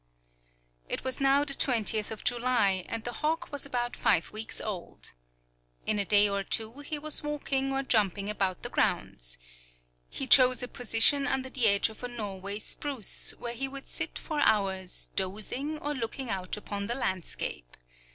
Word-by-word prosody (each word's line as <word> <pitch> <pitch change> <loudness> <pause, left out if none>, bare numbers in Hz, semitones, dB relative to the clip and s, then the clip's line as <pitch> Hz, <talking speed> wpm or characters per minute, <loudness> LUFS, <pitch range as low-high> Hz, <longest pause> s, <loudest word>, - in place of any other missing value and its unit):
It - - -2
was 260 +2 -3
now 275 +1 +4
the 280 - 0
20th 220 -5 +1
of 220 - -7
July, 235 -6 +2
and 225 -1 -3
the 240 - -4
hawk 310 +6 -2
was 285 -1 0
about 245 -2 -2
five 165 - +2
weeks 220 +1 -3
old. 195 -5 -6 0.7
In 210 - +1
a 200 - +2
day 205 +1 +6
or 200 -1 -1
two 225 +6 -1
he 295 +1 -5
was 305 +1 0
walking 280 -2 -2
or 270 0 0
jumping 200 -5 +1
about 195 -3 -1
the - - -4
grounds. - - -1 0.7
He - - -4
chose 255 -1 +8
a - - -3
position 245 +4 +4
under 260 -1 -1
the 250 -5 +3
edge 200 +1 +4
of 220 - -13
a - - -2
Norway 200 -4 -5
spruce, 260 +1 -1
where 235 -1 -5
he 270 +3 -3
would 275 0 -8
sit 320 0 -3
for 305 -2 -4
hours 195 -6 +1
dozing, 215 +10 -2
or 295 0 -3
looking 250 0 -4
out 185 0 -3
upon 200 -1 -5
the 240 - -1
landscape. 185 - -3
235 Hz, 170 wpm, -29 LUFS, 200-270 Hz, 0.7 s, chose